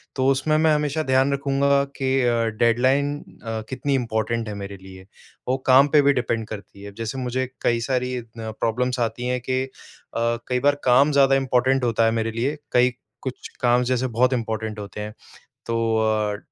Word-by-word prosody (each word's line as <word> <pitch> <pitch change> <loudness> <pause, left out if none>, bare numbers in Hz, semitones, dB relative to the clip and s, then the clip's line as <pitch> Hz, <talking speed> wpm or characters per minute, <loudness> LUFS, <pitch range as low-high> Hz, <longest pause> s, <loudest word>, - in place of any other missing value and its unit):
तो 130 -1 +1
उसमें 145 +3 +2
मैं 155 0 +4
हमेशा 150 +1 0
ध्यान 130 0 +2
रखूँगा 140 0 +2
कि 135 -1 0
अ, 120 -1 +2 0.3
डेडलाइन 130 +5 +3 0.3
अ, 115 -1 -3
कितनी 135 +2 -2
इम्पोर्टेंट 115 -2 -1
है 105 - -4
मेरे 100 0 -7
लिए। 95 0 -12 0.4
वो 130 +1 +1
काम 135 +2 +7
पे 150 - +7
भी 140 0 +4
डिपेंड 115 -4 -1
करती 100 -2 -9
है। 100 - -7
अब - - -23
जैसे 115 +3 -4
मुझे 130 0 -1 0.2
कई 120 -1 +2
सारी 125 -1 0
अ, - - -9 0.2
प्रॉब्लम्स 115 +3 -2
आती 120 +1 -2
हैं 125 0 0
कि 130 0 +1
अ, 135 - -7 0.8
कई 125 0 0
बार 145 +2 +3
काम 130 +4 +5
ज़्यादा 135 -1 +4
इम्पोर्टेंट 130 0 +2
होता 115 -1 +2
है 115 - +3
मेरे 115 0 -2
लिए, 125 +7 -2
कई 125 +1 +4 0.3
कुछ 130 -1 -6
काम 120 0 +3
जैसे 130 +1 +1
बहुत 125 +2 +4
इम्पोर्टेंट 110 -2 -3
होते 105 +1 -7
हैं, 105 0 -6 0.5
तो 115 - -2 0.2
अ, 110 -1 +1
125 Hz, 190 wpm, -23 LUFS, 115-135 Hz, 0.8 s, काम